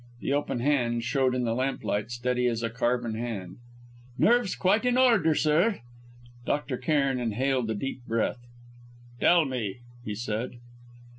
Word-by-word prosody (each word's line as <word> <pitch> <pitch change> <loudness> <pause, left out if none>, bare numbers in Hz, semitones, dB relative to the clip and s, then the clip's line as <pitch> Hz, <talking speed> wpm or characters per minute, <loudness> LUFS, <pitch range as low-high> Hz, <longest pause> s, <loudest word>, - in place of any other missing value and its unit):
The 140 - -1
open 145 -4 -1
hand 120 -4 +1
showed 130 0 +1
in 125 - 0
the 115 -1 0
lamplight 120 -4 -1
steady 125 +1 0
as 115 -1 -1
a 115 - -1
carven 120 -1 0
hand. 110 -6 -5 0.6
"Nerves 235 -4 +3
quite 200 +5 +2
in 250 0 +2
order, 225 -12 +4
sir." 160 - +2 0.6
Dr. 140 -1 -1
Cairn 140 -1 +1
inhaled 125 +1 0
a 110 - -1
deep 130 +4 -5
breath. 115 +2 0 0.8
"Tell 170 +2 +5
me," 120 -8 -3 0.3
he 105 -2 -4
said. 110 +3 -3
125 Hz, 145 wpm, -27 LUFS, 115-145 Hz, 0.8 s, Tell